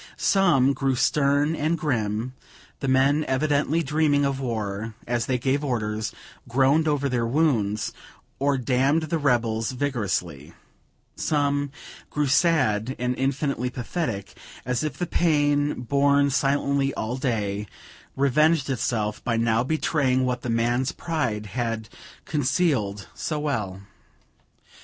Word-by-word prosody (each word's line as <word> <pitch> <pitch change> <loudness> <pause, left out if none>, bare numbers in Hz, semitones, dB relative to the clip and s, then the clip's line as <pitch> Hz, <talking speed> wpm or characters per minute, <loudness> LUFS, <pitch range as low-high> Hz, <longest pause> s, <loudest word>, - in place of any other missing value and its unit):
Some 155 -9 +3
grew 135 -1 0
stern 145 +4 +2
and 155 +2 0
grim, 120 -5 -1 0.5
the 135 - -3
men 135 +3 +3
evidently 145 +4 +1
dreaming 145 -1 +2
of 135 -1 -1
war, 110 -3 -3
as 120 -1 -1
they 130 - +1
gave 135 +3 0
orders, 110 -5 -2 0.4
groaned 135 +6 +3
over 145 -2 +1
their 120 -3 0
wounds, 115 -7 +1 0.5
or 140 0 +2
damned 135 +5 +2
the 160 +1 -1
rebels 120 -4 +1
vigorously; 95 - -3 0.6
some 145 -1 0 0.4
grew 150 0 0
sad 135 -6 +2
and 125 +1 -1
infinitely 135 -2 -1
pathetic, 120 - -4 0.3
as 125 +1 -1
if 150 -4 -3
the 175 - -1
pain 145 -5 +1
borne 140 +2 +3
silently 140 0 +1
all 110 +3 -2
day, 105 -6 -2 0.5
revenged 140 +2 +3
itself 110 -4 -2
by 115 -2 0
now 115 0 +2
betraying 135 -3 +1
what 125 -1 -1
the 125 - -4
man's 120 +3 +1
pride 125 -11 -2
had 115 0 -3 0.4
concealed 130 - 0
so 155 - -3
well. 105 -11 -2
130 Hz, 125 wpm, -25 LUFS, 115-145 Hz, 0.6 s, Some